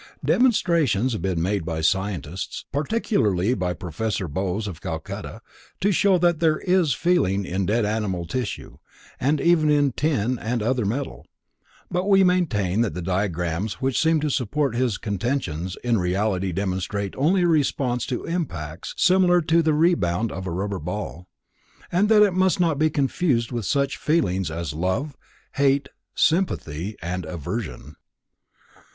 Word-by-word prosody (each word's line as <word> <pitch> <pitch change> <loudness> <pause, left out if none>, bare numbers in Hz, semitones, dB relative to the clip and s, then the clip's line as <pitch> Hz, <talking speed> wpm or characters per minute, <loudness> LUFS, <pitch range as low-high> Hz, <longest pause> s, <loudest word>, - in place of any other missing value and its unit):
Demonstrations 165 - +2
have 110 - -3
been 90 -3 -1
made 100 0 0
by 80 -1 -3
scientists, 90 0 -2
particularly 135 - +1
by 90 -5 -1
Professor 90 +4 -3
Bose 95 +6 -2
of 90 -6 -7
Calcutta, - - -6 0.4
to 205 - +2
show 195 0 +4
that 175 -2 +2
there 160 -2 +3
is 180 -8 +2
feeling 100 - +1
in 95 +1 -2
dead 110 +2 +2
animal 105 -5 -2
tissue 105 +6 -5 0.4
and 145 +3 +1
even 170 -3 +3
in 145 -2 +3
tin 130 -4 0
and 115 0 -2
other 120 -1 0
metal, 130 +7 -4 0.6
but 180 +1 0
we 195 -1 +6
maintain 115 - +1
that 110 -9 -1
the 90 - -4
diagrams 90 +1 -1
which 135 -1 0
seem 160 0 +3
to 150 0 -1
support 135 +1 0
his 120 -4 0
contentions 95 - -3
in 120 -3 +2
reality 95 +1 0
demonstrate 95 +2 -2
only 175 +7 +2
a - - +3
response 135 -6 +1
to 125 - -3
impacts 85 - -4
similar 180 -1 +4
to 165 +1 +3
the 160 -1 +2
rebound 115 - +2
of 95 0 -5
a - - -3
rubber 95 +2 -3
ball, 90 +1 -5 0.6
and 195 +4 +2
that 210 -3 +5
must 185 0 +2
not 165 -5 +1
be 155 0 +3
confused 140 -4 0
with 120 -4 -3
such 140 -1 0
feelings 95 - 0
as 80 -2 -4
love, 95 - -2 0.4
hate, 140 0 +2 0.3
sympathy 105 - 0
and 90 +1 -3
aversion. 80 - -6
115 Hz, 150 wpm, -23 LUFS, 95-155 Hz, 0.6 s, we